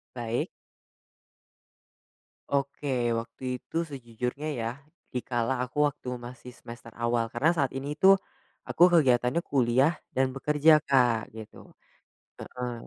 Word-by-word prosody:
Baik. 120 0 -2 2.0
Oke. 140 -3 -1
Waktu 120 +2 -3
itu 165 +6 -3
sejujurnya 125 +2 -5
ya, 115 -3 -3 0.4
di 125 - -3
kala 125 0 -1
aku 145 +3 +1
waktu 130 -3 -7
masih 125 0 -10
semester 115 -1 -12
awal 120 0 0
karena 135 +7 +2
saat 140 -4 0
ini 140 +3 -5
tuh 195 +3 +6 0.5
aku 170 - +3
kegiatannya 130 -1 +3
kuliah 135 +3 +2 0.2
dan 130 0 +2
bekerja 150 +3 +4
Kak, 120 -6 +2
gitu. 110 -1 -12 0.7
Heeh. 125 -1 -5
125 Hz, 115 wpm, -28 LUFS, 120-145 Hz, 2.0 s, tuh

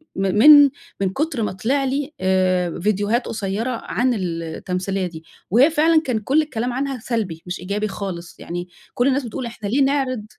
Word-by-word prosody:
من 195 +1 0
من 290 +1 +9 0.3
من 190 - +2
كُتر 280 - -2
ما - - -1
طلِع 260 +9 0
لي 280 +3 -2
آآ، 185 -2 +1
فيديوهات 210 +5 0
قصيّرة 220 +3 -2
عن 250 +1 +1
ال 170 -5 -3
التمثيلية 185 +3 -3
دي. 160 -2 -10 0.3
وهي 260 +8 +6
فعلًا 315 +1 +3
كان 250 -8 -1
كلّ 275 +9 +2
الكلام 250 -4 -3
عنها 270 -1 -2
سلبي 215 -9 -3
مش 180 - -5
إيجابي 205 +4 -2
خالص، 185 -4 -6
يعني 175 +1 -5 0.3
كلّ 245 +2 +1
الناس 275 0 +1
بتقول 235 +2 -5
إحنا 220 -3 -6
ليه 270 +6 +2
نعرِض 265 -5 0
220 Hz, 180 wpm, -21 LUFS, 190-270 Hz, 0.3 s, من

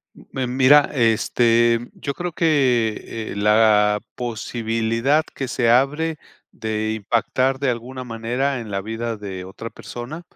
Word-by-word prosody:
Mm, - - -16
Mem 130 -1 -3
mira, 140 +2 +6
este, 115 0 +2
yo 140 -1 -5
creo 175 -1 -4
que, 125 -8 0
eh, - - -8
la 105 0 +4
posibilidad 115 +4 -1
que 135 -2 -4
se 120 -2 +1
abre 150 +6 +2 0.3
de 110 -1 -3
impactar 120 +5 0
de 135 -1 +1
alguna 125 +2 -5
manera 125 +4 -2
en 110 -3 -8
la 100 0 -2
vida 115 +2 -4
de 95 -3 -7
otra 95 +5 -8
persona. 125 +8 -8
120 Hz, 140 wpm, -21 LUFS, 110-130 Hz, 0.3 s, mira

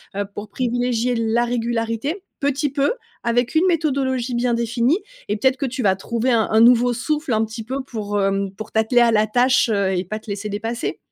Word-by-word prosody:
Heu 200 0 -1
pour 205 0 -7
privilégier 245 0 0
la 230 +1 +1
régularité 235 - -2 0.2
petit 285 0 0
peu, 285 - +1 0.3
avec 240 +1 +1
une 335 +4 +4
méthodologie 270 -7 0
bien 240 0 +1
définie 235 +6 +1 0.3
et 210 - 0
peut-être 260 +3 +2
que 275 - -2
tu 255 0 -4
vas 190 -2 +3
trouver 235 +6 -1
un 225 -3 +2
un 220 - +4
nouveau 245 +1 +6
souffle, 295 +3 -2
un 220 0 +2
petit 220 +1 -7
peu 260 +4 -4
pour, 205 -5 -3
hem, 195 0 0
pour 215 - -8
t'atteler 220 +3 +3
à 235 -1 +5
la 215 0 +3
tâche, 245 +3 +3
heu, 200 -2 +1
et 180 - -1
pas 215 +5 -4
te 220 - -22
laisser 205 +1 -4
dépasser. 225 +4 -3
235 Hz, 205 wpm, -21 LUFS, 220-255 Hz, 0.3 s, nouveau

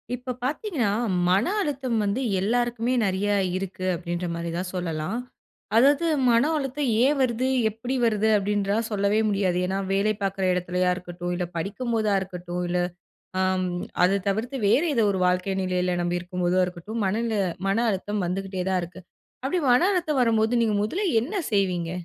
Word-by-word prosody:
இப்ப 250 +1 -5
பார்த்தீங்கனா, 290 - -1 0.4
மன 190 +4 +3 0.2
அழுத்தம் 270 - -1
வந்து 205 +5 0 0.2
எல்லாருக்குமே 240 +3 0
நிறைய 195 +1 0 0.3
இருக்கு 185 -1 -5
அப்பிடின்றமாரி 170 -1 -3
தான் 180 +1 -3
சொல்லலாம். 175 +3 -2 0.6
அதாவது 280 +6 +5 0.2
மன 235 +1 +5
அழுத்தம் 275 -1 -2 0.2
ஏன் 290 +2 +2
வருது 255 0 +1 0.2
எப்படி 225 +5 -4
வருது 220 -1 +2
அப்படின்னு 205 0 0
சொல்லவே 205 +1 +2
முடியாது. 195 -3 +1
ஏன்னா 190 +1 -1
வேலை 200 +2 +2
பாக்கிற 195 -1 -1
இடத்திலயா 180 0 0
இருக்கட்டும், 175 -1 -6
இல்ல 175 0 -2
படிக்கும் 210 +8 -3
போதா 215 -2 +1
இருக்கட்டும், 180 -1 -5
இல்ல 180 - +1 0.6
ஆம். 185 0 +1 0.4
அத 195 +2 +3
தவிர்த்து 225 +7 -1
வேறு 280 +11 +4
ஏதோ 230 -4 +3
ஒரு 190 - -2
வாழ்க்கை 180 +2 0
நிலையில 180 0 0
நம்பி 175 0 -1
இருக்கும் 180 +1 -5
போதோ 180 +1 +2
இருக்கட்டும், 180 +6 -5
மனநில 220 +2 0 0.3
மன 195 +2 +2
அழுத்தம் 205 +1 -2
வந்துகிட்டே 190 0 -3
தான் 185 -1 +1
இருக்கு. 180 +2 -9 0.4
அப்படி 280 +7 0
மன 245 - +5
அழுத்தம் 320 -7 0
வரும்போது 225 -1 +2
நீங்க 220 -2 +2
முதல்ல 360 - -1 0.2
என்ன 295 - -5 0.2
செய்வீங்க? 180 -4 +1
200 Hz, 155 wpm, -25 LUFS, 180-235 Hz, 0.6 s, அதாவது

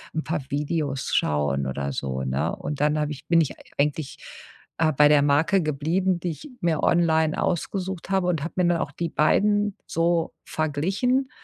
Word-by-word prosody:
'n 160 - -1
paar 160 -2 -2
Videos 145 -1 -2
schauen 70 -2 +1
oder 70 +1 -3
so, 65 -1 -3
ne? 65 +1 -1
Und 145 -2 -5
dann 150 +1 +2
habe 150 0 -1
ich 140 - -9
bin 170 -1 +4
ich 150 - -1 0.2
eigentlich, 145 0 -1 0.6
äh, 160 -1 +3
bei 150 +1 +5
der 150 -1 +5
Marke 160 +6 +3
geblieben, 165 +5 0
die 175 0 -2
ich 285 - -10
mir 170 -4 0
online 160 -2 +2
ausgesucht 190 +1 -2
habe, 190 -2 +1
und 165 -5 0
habe 165 - -5
mir 180 - +3
dann 175 -1 +2
auch 145 - -3
die 170 +3 -3
beiden 205 +6 +2
so 165 0 0
verglichen 195 - 0
160 Hz, 180 wpm, -24 LUFS, 145-175 Hz, 0.6 s, bei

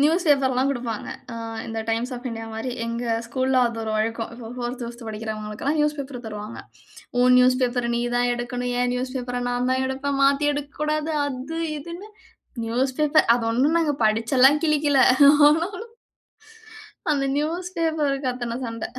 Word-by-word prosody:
News 330 +5 +3
பேப்பர்லாம் 270 -2 +3
கொடுப்பாங்க. 240 -5 -4 0.6
இந்த 225 0 -4
Times 230 +3 -1
of 245 - -10
India 225 0 -6
மாதிரி 225 +3 -4 0.2
எங்க 235 +1 -3 0.2
ஸ்கூல்ல 260 +2 +1
அது 230 - -7
ஒரு 220 - -3
வழக்கம், 225 +1 -2
இப்போ 230 -1 -9
4த் 245 +1 -4
5த் 235 0 -8
படிக்கிறவங்களுக்கு 215 -1 -6
எல்லாம் 295 +3 +1
நியூஸ் 300 0 +1
பேப்பர் 265 -3 -6
தருவாங்க. 210 +1 -7 0.6
உன் 250 0 +6
நியூஸ்பேப்பர 250 -1 +2
நீ - - 0 0.2
தான் 245 0 +2
எடுக்கணும். 245 +1 -3
என் 245 0 +1
நியூஸ்பேப்பர 250 -1 -3
நான் 245 +1 0
தான் 260 0 +1
எடுப்பேன், 275 +1 -2
மாத்தி 280 +1 +3
எடுக்கக்கூடாது, 300 +2 -2
அது 280 +4 -5 0.2
இதுனு 340 +7 -9 0.6
நியூஸ்பேப்பர் 265 +5 +2
அது 235 - -2
ஒண்ணும் 280 +8 +2
நாங்க 300 -3 +1
படிச்செல்லாம் 255 +7 +4
கிழிக்கல. 295 -2 +2 0.5
ஆனாலும், 365 +8 -1 1.2
அந்த 275 -1 0
நியூஸ்பேப்பர்க்கு 315 -5 -1
அத்தனை 240 -1 -4
சண்ட. 230 -1 -5
255 Hz, 145 wpm, -23 LUFS, 235-290 Hz, 1.2 s, உன்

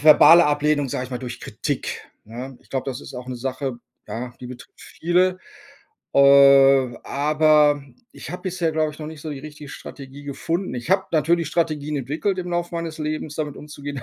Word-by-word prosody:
verbale 155 +2 +8
Ablehnung, 145 -1 +1
sage 125 - -3
ich 130 - -10
mal 125 - -3
durch 125 -1 -7
Kritik, - - -4 0.2
ne? 125 +4 -8
Ich - - -27
glaube, 135 -1 -2
das 130 0 -5
ist - - -11
auch 125 0 -7
'ne 130 -1 -5
Sache, 130 0 -4 0.3
ja, 120 +2 -5
die 125 - -7
betrifft 125 0 -12
viele. 180 +2 0 0.8
Äh, 140 -2 +6
aber 150 0 +3 0.3
ich - - -9
habe 180 0 -7
bisher, 175 -3 -1
glaube 155 -1 0
ich, - - -15
noch 150 - -5
nicht 160 -2 -10
so 155 - -6
die 140 -2 -6
richtige 150 0 -10
Strategie 140 0 -10
gefunden. 165 +6 -3
Ich 120 +1 -6
habe 190 0 +3
natürlich 165 +1 +2
Strategien 150 -2 -1
entwickelt, 155 +9 -2
im 180 -1 -4
Laufe 175 0 -2
meines 165 -1 -4
Lebens 155 0 -4
damit 150 -2 -3
umzugehen. 145 -2 -7
150 Hz, 190 wpm, -22 LUFS, 135-160 Hz, 0.8 s, verbale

